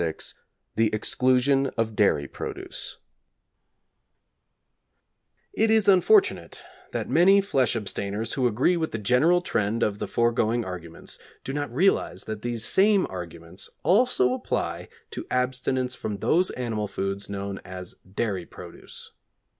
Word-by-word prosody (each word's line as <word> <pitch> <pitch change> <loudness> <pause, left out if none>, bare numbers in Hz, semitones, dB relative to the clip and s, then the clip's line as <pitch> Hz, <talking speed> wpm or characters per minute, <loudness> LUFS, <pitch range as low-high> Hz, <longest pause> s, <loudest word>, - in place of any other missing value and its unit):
VI 80 -2 -1 0.6
THE 110 -1 +3
EXCLUSION 130 +4 +2
OF 110 -1 -1
DAIRY 75 -9 +2
PRODUCE - - -5 2.6
It 220 +1 +2
is 220 -2 +3
unfortunate 385 - +3 0.3
that - - -3
many 195 +4 +5
flesh 135 - +1
abstainers 105 0 -3
who 130 -3 +2
agree 125 +10 +2
with 160 -1 -2
the - - -1
general 130 - +3
trend 110 - -1
of 105 -1 -1
the - - -3
foregoing 115 0 +1
arguments 85 -3 -8 0.2
do 135 - -5
not 145 -3 -3
realise 180 +11 +1
that 110 -1 -6
these 120 -2 -1
same 200 0 +4
arguments 85 0 -8
also 180 - +3
apply 130 - -3 0.2
to - - -7
abstinence 125 0 -1
from 105 -5 -4
those 180 - +2
animal 110 -4 -3
foods 100 +1 -4
known 100 -1 -4
as 90 -1 -9 0.2
dairy 95 -4 -2
produce. - - -11
120 Hz, 130 wpm, -25 LUFS, 100-145 Hz, 2.6 s, many